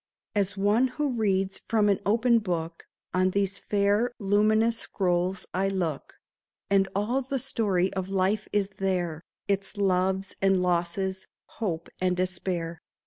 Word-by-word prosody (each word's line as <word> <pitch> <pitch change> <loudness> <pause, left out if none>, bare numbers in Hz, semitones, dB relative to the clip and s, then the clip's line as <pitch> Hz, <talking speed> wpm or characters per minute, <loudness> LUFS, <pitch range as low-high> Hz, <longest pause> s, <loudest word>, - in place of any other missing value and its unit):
As 200 -2 0
one 210 +6 +3
who 295 -2 +1
reads 195 -5 0
from 215 -2 +3
an 200 -2 +3
open 235 +2 +4
book, 170 -5 -4 0.3
On 185 0 +3
these 195 0 0
fair 205 +4 +1
luminous 215 +3 +2
scrolls 180 0 -1
I 195 +2 +1
look; 175 -7 -3 0.6
And 195 -1 +4
all 225 +7 +1
the 270 +1 -2
story 200 -8 0
of 190 0 -3
life 195 +2 +1
is 200 -2 +1
there 175 -5 -1
— - - -62
Its 200 +1 -1
loves 190 0 +1
and 195 -1 +3
losses, 180 +2 -1 0.2
hope 170 -7 -4
and 180 -1 +1
despair. 180 -2 -2
195 Hz, 140 wpm, -27 LUFS, 185-210 Hz, 0.6 s, open